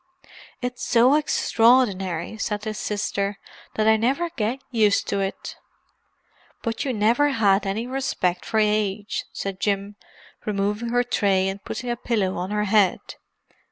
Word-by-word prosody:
"It's 250 0 -4
so 245 +3 +4
extraordinary," 225 - +2
said 210 -2 -2
his 215 -1 -4
sister, 200 -1 -2 0.4
"that 215 0 +1
I 220 0 +6
never 275 +10 0
get 230 +2 -2
used 215 -4 +2
to 200 - 0
it." 195 0 -4 1.1
"But 230 +1 -2
you 275 - -1
never 235 +6 +3
had 200 -6 +2
any 215 +4 -2
respect 250 -9 -1
for 220 - -2
age," 210 -1 0
said 195 -1 -5
Jim, 200 0 -1 0.5
removing 210 +2 -1
her 245 +1 +2
tray 195 -5 +1
and 195 +1 -5
putting 245 -1 -4
a - - -1
pillow 215 -6 -1
on 180 +2 -3
her 210 0 0
head. 205 -3 +3
210 Hz, 145 wpm, -23 LUFS, 200-240 Hz, 1.1 s, I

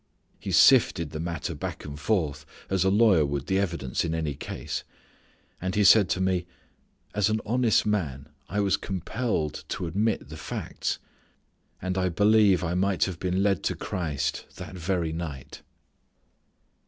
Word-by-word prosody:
He - - -5
sifted 80 -3 +5
the 75 - -5
matter 85 0 -3
back 75 - -6
and 75 0 -7
forth 75 -6 0 0.3
as 95 -2 +2
a 95 - +3
lawyer 100 -5 +5
would 70 -1 -2
the 95 0 +1
evidence 85 -9 -1
in 80 -1 -1
any 80 -3 -1
case. - - -5 0.8
And 95 0 -2
he 105 - +3
said 100 0 +7
to - - 0
me, 95 -2 0 0.7
"As 105 +1 +2
an 110 0 +1
honest 120 -1 +2
man 75 -10 -1 0.2
I 105 +3 0
was 100 -2 +2
compelled 95 -3 -2
to - - -3
admit 105 +7 -1
the - - -8
facts, - - -3 0.8
and 95 +1 -2
I 95 0 +1
believe 100 0 +4
I 85 0 -1
might 95 +1 +1
have 90 -4 -2
been 95 +1 0
led 100 -4 +2
to - - 0
Christ 80 -7 -3
that - - -8
very 85 -2 -1
night." 80 -5 -6
90 Hz, 160 wpm, -27 LUFS, 80-100 Hz, 0.8 s, said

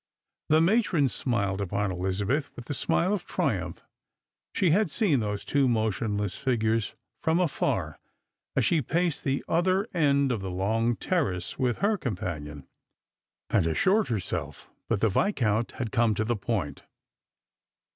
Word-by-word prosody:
The 155 +1 +5
matron 170 - +3
smiled 100 -6 -1
upon 100 +1 -1
Ehzabeth 95 +10 -1
with 120 - -9
the 145 - -3
smile 180 +7 +1
of 195 -4 -2
triumph; 100 - -2 0.7
she 185 -5 +2
had 200 +2 +3
seen 150 - +2
wiose 105 -2 -3
two 140 -2 +2
motionless 110 -3 0
figures 115 -4 0 0.3
from 160 +1 +2
atar 175 -5 0 0.6
as - - +2
she 165 -3 +3
paced 170 +4 -1
the 135 0 -1
other 185 +4 +2
end 140 -5 +3
of 115 -5 -2
the 95 - -4
long 110 +6 0
terrace 125 - -2
with 125 -3 +1
her 210 -1 +2
companion, 75 - -5 0.8
and 90 -5 +3
assured 190 - +2
herself 105 -7 -4 0.2
that 110 -4 0
the 115 - +4
Viscount 115 - +1
had 120 -3 -4
come 115 -2 +2
to 110 - 0
the 120 +2 0
point. 95 -9 -3
120 Hz, 145 wpm, -27 LUFS, 100-160 Hz, 0.8 s, The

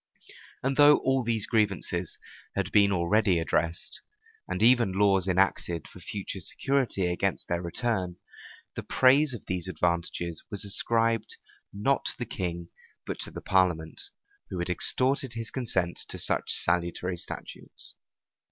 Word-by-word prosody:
And 135 +1 0
though 145 0 +8
all 135 -1 +1
these 115 -3 +1
grievances 95 -6 0 0.4
had 100 -2 -1
been 100 -1 +5
already 95 +1 +2
redressed, 85 0 -1 0.5
and 95 - -2
even 120 -4 +5
laws 95 -2 +3
enacted 90 -3 +1
for - - -14
future 95 +2 -5
security 125 - -1
against 90 0 -1
their 85 0 -1
return, 90 0 -2 0.6
the - - -3
praise 135 +1 +4
of 115 - -11
these 90 -1 -2
advantages 85 -1 -2
was 100 0 -2
ascribed, 115 +2 +1 0.3
not 130 +7 0
to - - 0
the 120 - -3
king, 85 -4 -4 0.4
but - - -5
to - - -2
the - - -8
parliament, 85 -4 +1 0.5
who 95 - -5
had 85 +1 -2
extorted 130 +6 +3
his 115 -1 -4
consent 95 -9 -1
to - - -4
such - - 0
salutary 85 +1 0
statutes. 85 - -8
95 Hz, 140 wpm, -28 LUFS, 85-115 Hz, 0.6 s, though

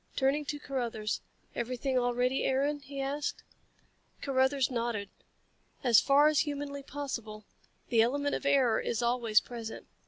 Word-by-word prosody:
Turning 275 +2 +2
to 295 0 -4
Carruthers. 235 -7 -3 0.3
"Everything 255 +2 -2
all 245 -1 +1
ready, 250 +2 +1
Aaron?" 280 +3 +1
he 280 0 -8
asked. 280 +2 -2 0.8
Carruthers 265 0 +2
nodded. 230 -4 -2 0.7
"As 240 -4 +6
far 285 +2 +5
as 305 -2 +3
humanly 285 -2 -2
possible. 235 -7 -6 0.4
The 230 -2 +4
element 285 +5 +1
of - - -2
error 265 -5 +4
is 230 0 -2
always 235 -3 +3
present. 230 -2 -7
265 Hz, 135 wpm, -31 LUFS, 235-280 Hz, 0.8 s, As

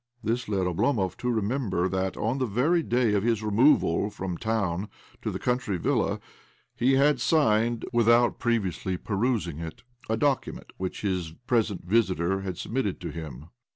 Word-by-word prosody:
This 115 +1 -1
led 95 -3 0
Oblomov 95 +2 0
to 125 - -2
remember 110 -5 0
that, 95 0 -2
on 115 +6 -1
the 130 - 0
very 140 - +2
day 120 -6 +1
of 100 - +2
his 115 0 0
removal 105 - +3
from 95 -3 -5
town 100 -3 -1 0.3
to - - -2
the - - -3
country 125 -6 -1
villa, - - 0 0.6
he 130 +3 +2
had 140 -1 +3
signed, 120 -6 +2
without 120 +1 +4
previously 95 -5 -1
perusing 100 - -1
it, 80 +4 -7 0.3
a 110 - +1
document 140 +2 -1
which 95 -1 -4
his 90 -5 -2
present 110 -7 0
visitor 95 -2 +1
had 95 -3 -5
submitted 115 -5 -2
to 85 - -4
him. 75 -2 -8
105 Hz, 155 wpm, -27 LUFS, 95-120 Hz, 0.6 s, without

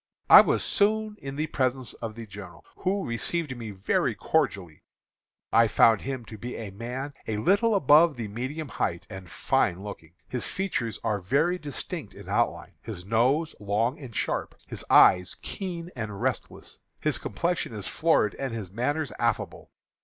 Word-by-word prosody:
"I - - +13
was - - +1
soon 215 +1 +1
in 135 0 -6
the 155 +2 -1
presence 130 -4 -1
of 110 -2 -6
the 115 -1 -7
general, 95 -6 -11
who 195 +1 -1
received 130 +5 -2
me 115 -2 -6
very 95 -1 0
cordially. 85 -6 -1 0.7
I 115 0 +6
found 110 -1 +5
him 130 -3 -4
to 110 -2 -10
be 120 +4 -6
a 110 -4 -6
man 125 +7 -5
a 110 - -1
little 205 - +3
above 155 -2 +6
the 115 -3 -4
medium 130 +9 -4
height, 85 -7 -2
and 95 -3 -8
fine 90 +2 0
looking. 85 -5 -9
His 125 -2 -1
features 125 - -2
are 105 -3 0
very 155 - +1
distinct 145 -6 -6
in - - -11
outline, - - 0
his 95 -6 -8
nose 130 +9 +2
long 105 +6 0
and 125 -6 -10
sharp, - - -2
his - - -7
eye 90 -1 +7 0.2
keen 175 -3 -5
and 105 -5 -5
restless. - - -4 0.2
His - - 0
complexion 170 - -2
is 105 -3 -5
florid 160 -10 +2
and 135 -4 -3
his 100 -6 -6
manners 140 +5 -1
affable. - - -1
120 Hz, 165 wpm, -27 LUFS, 105-155 Hz, 0.7 s, I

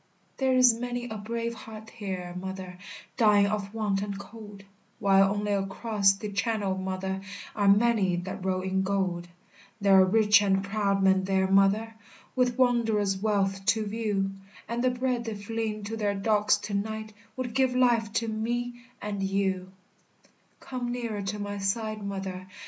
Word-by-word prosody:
There 265 -1 +2
is 250 -2 +7
many 245 +1 -4
a 220 - -5
brave 230 +2 -3
heart 220 -1 -10
here, 185 -5 -5
mother, 190 -1 -7 0.4
Dying 210 -4 +5
of 200 -1 -2
want 210 -3 -1
and 200 -1 -4
cold, 205 -1 -11 0.3
While 195 -2 +4
only 205 0 -1
across 200 +1 +2
the 205 +1 -6
Channel, 205 -2 0
mother, 190 0 -3 0.3
Are 205 -2 +1
many 205 -3 +4
that 180 +1 -5
roll 185 -1 0
in 190 0 0
gold; 190 -3 -1 0.5
There 200 -1 +4
are - - +8
rich 210 +1 +5
and 195 -1 +2
proud 200 -1 0
men 190 0 +4
there, 190 0 +2
mother, 195 +4 +3 0.4
With 250 -1 +1
wondrous 220 -6 +2
wealth 195 -2 0
to 220 0 +3
view, 205 -2 -1 0.4
And 235 +2 -2
the 255 - +4
bread 250 -1 -1
they 225 -2 -3
fling 215 +1 -3
to 215 +2 -4
their 205 -2 0
dogs 210 +1 +2
to 210 - -5
night 215 +1 -3 0.2
Would 250 -2 -3
give 260 -1 +2
life 235 -4 +3
to 230 0 0
me 240 +2 -2 0.2
and 205 -1 -3
you. 190 -1 -1 0.9
Come 245 -2 -4
nearer 235 -4 -3
to 200 +2 -3
my 205 0 -4
side, 215 +2 -2
mother. 190 -2 -5
205 Hz, 160 wpm, -28 LUFS, 195-225 Hz, 0.9 s, are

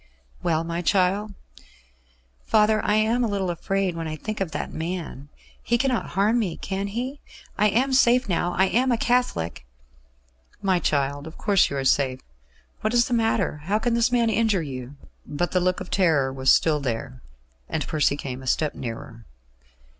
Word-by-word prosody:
"Well, 160 -1 +1
my 170 +1 -3
child?" 195 +3 +1 1.1
"Father, 215 0 +3
I 210 - +2
am 225 +3 +2
a - - +1
little 195 -3 -1
afraid 190 +1 -1
when 165 -1 -4
I 155 - -4
think 215 +7 -5
of 190 - 0
that 155 - -5
man. 160 -4 -5 0.3
He 235 - +1
cannot 255 -1 0
harm 215 +5 +3
me, 190 -8 -2
can 195 +1 -3
he? 250 +7 -4 0.3
I 210 - +3
am 260 +6 +1
safe 250 -1 +4
now? 175 -1 0
I 190 - +4
am 250 +6 +2
a 235 - +2
Catholic 235 - 0 0.5
?" - - -36
"My 190 -2 +2
child, 145 -1 -1
of 160 - -11
course 200 -3 +3
you 140 - -3
are 135 - -2
safe. 130 -1 +2 0.6
What 215 +3 -1
is 235 0 +4
the - - -1
matter? 225 -8 +1
How 200 +4 +1
can 235 +2 0
this 235 +1 +2
man 235 -2 +2
injure 215 -5 +1
you?" 130 -1 -7 0.3
But 150 +5 -3
the 185 - +2
look 180 0 0
of - - -8
terror 155 -8 +2
was 130 0 +3
still 155 -2 +3
there, 130 0 -4 0.5
and 150 -3 -2
Percy 150 -2 +1
came 130 -2 -6
a 130 - -10
step 150 +3 +1
nearer. 115 -1 -8
180 Hz, 185 wpm, -24 LUFS, 145-220 Hz, 1.1 s, safe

